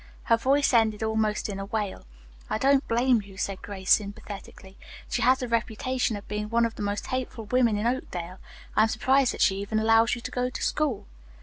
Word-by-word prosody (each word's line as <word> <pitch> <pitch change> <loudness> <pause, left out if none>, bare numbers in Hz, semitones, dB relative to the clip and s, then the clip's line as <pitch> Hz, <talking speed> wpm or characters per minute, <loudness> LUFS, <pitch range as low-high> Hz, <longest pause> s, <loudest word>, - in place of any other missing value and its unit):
Her 230 - +3
voice 275 +3 +2
ended 220 -2 +3
almost 220 -1 0
in 200 -2 -5
a 195 - -4
wail. 205 - -4 0.4
"I - - 0
don't 275 +3 +3
blame 240 0 +3
you," 195 -1 -14
said 195 -1 -3
Grace 190 -2 -4
sympathetically. 200 -1 -1 0.3
"She - - -2
has 255 +2 +5
the 255 -2 -4
reputation 235 +1 -1
of 205 - -9
being 210 0 -4
one 235 +1 +3
of 230 - -3
the - - -8
most 205 0 -2
hateful 255 -3 -4
women 235 -2 +2
in 210 - -2
Oakdale. 185 -8 -3 0.4
I - - +5
am 220 - +5
surprised 260 +4 +2
that - - -6
she 195 - +4
even 200 +2 -2
allows 225 +2 +4
you 240 - -8
to - - -6
go 250 0 -1
to - - -6
school." 290 -8 -1
220 Hz, 210 wpm, -26 LUFS, 205-250 Hz, 0.4 s, has